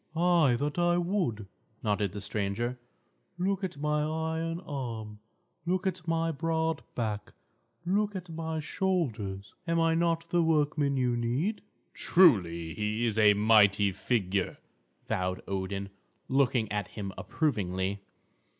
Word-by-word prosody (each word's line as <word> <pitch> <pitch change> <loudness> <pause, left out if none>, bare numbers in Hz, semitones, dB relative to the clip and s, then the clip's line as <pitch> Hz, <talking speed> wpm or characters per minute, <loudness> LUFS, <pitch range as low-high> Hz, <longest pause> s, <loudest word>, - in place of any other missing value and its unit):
"Ay, 170 -6 +4
that 145 +6 -2
I 175 0 +3
would," 175 - -1 0.4
nodded 105 -2 0
the 105 - -6
stranger, 110 +5 -2 0.6
"Look 195 +2 0
at 180 -4 -3
my 150 +1 0
iron 160 +2 -2
arm; 115 - -5 0.5
look 185 +2 0
at 185 -2 -2
my 165 0 +1
broad 160 +1 -1
back; 110 -3 -3 0.5
look 205 +3 +1
at 180 -1 -5
my 160 -1 -4
shoulders. 125 - -2
Am 165 0 +2
I 165 0 +3
not 165 0 +1
the 175 0 +3
workman 150 -3 +2
you 125 -2 +1
need?" 130 - -1 0.3
"Truly, 85 - +4
he 105 +2 -1
is 110 -1 0
a 105 -1 +6
mighty 105 -1 +5
figure," 95 -1 -1 0.5
vowed 90 0 -1
Odin, 100 +1 -3 0.4
looking 130 -4 +2
at 105 -2 -1
him 100 -3 -6
approvingly. 100 - -1
135 Hz, 130 wpm, -29 LUFS, 105-165 Hz, 0.6 s, a